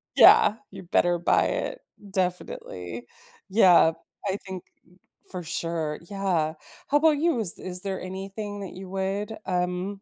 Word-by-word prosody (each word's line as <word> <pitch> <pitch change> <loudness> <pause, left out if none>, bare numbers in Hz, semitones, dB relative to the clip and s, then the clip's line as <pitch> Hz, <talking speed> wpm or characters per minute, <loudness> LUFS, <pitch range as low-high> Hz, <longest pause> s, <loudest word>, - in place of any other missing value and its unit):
Yeah, 210 - +8 0.2
you 190 -1 -9
better 175 0 +2
buy 175 - +3
it. - - -3 0.3
Definitely, 465 - -3 0.4
yeah, 185 -5 +6 0.4
I 195 - 0
think 190 -2 -6 0.7
for 180 - -4
sure, 165 -2 -3
yeah, 185 -6 0 0.3
how 290 - +4
about 305 0 +4
you? 325 -4 +2
Is 195 -6 -2
is 180 -1 -5
there 195 -1 -3
anything 195 +2 -6
that 195 - -7
you 190 0 -9
would, 195 +3 -2
um, 180 +2 -2
190 Hz, 140 wpm, -26 LUFS, 180-205 Hz, 0.7 s, Yeah